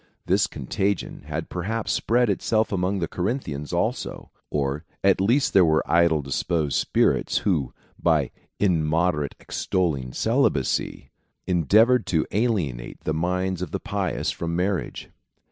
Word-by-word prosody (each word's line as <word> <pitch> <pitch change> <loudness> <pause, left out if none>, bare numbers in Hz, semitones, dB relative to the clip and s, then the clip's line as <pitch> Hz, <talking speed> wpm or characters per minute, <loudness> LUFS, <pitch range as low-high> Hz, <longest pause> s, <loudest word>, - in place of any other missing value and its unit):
This - - +3
con - - -8
tagion 100 -1 -2
had - - -4
perhaps 105 +6 -3
spread 120 +1 +2
itself 110 +2 +1
among 95 0 0
the - - -1
Corinthians 90 - -3
also; - - -2 0.2
or 70 +1 -1 0.2
at 95 -1 +4
least 130 +8 +2
there 95 - +7
were 80 -2 +3
idly 85 -2 +3
disposed 75 +2 -1
spirits, - - +2
who, 75 -10 +1 0.3
by 80 -6 +2 0.3
immo 85 -2 +2
derately 75 -4 -3
extolling 75 -9 -1
celibacy, 65 +1 0 0.3
endeavoured 110 - +4
to 80 -3 +1
alienate 90 - -1
the 80 - -1
minds 90 +2 -1
of 90 - -3
the - - -3
pious - - -2
from 85 0 -3
marriage. 95 +1 -2
90 Hz, 135 wpm, -24 LUFS, 75-100 Hz, 0.3 s, there